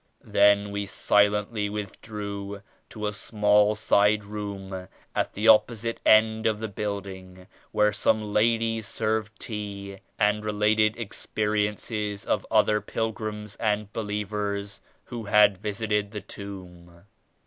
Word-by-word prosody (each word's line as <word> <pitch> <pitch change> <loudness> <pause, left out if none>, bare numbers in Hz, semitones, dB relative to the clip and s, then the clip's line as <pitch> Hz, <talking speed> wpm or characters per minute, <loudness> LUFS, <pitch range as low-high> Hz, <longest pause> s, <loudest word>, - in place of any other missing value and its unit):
Then 100 0 +4
we 100 0 -3
silently 105 +1 +2
withdrew 100 -1 -6 0.3
to 105 -1 -6
a 105 - -1
small 105 0 +3
side 105 0 +3
room 100 -3 -6 0.3
at - - 0
the 105 +3 0
opposite 115 +1 +4
end 110 0 +5
of 110 -1 +1
the 110 +1 -4
building 95 -3 -6 0.3
where 105 0 +3
some 110 +1 +2
ladies 115 0 +1
served 110 +1 -2
tea 100 -3 -6 0.2
and 105 0 +2
related 105 +1 +2
ex 115 -3 -7
periences 105 0 -1
of - - -1
other 105 -1 +3
pilgrims 105 -2 -4
and 105 -1 -1
believers 105 -1 -3 0.2
who 115 -2 -7
had 105 -2 +5
visited 105 0 -1
the 105 0 -6
Tomb. 90 -4 -10
105 Hz, 120 wpm, -26 LUFS, 100-110 Hz, 0.3 s, end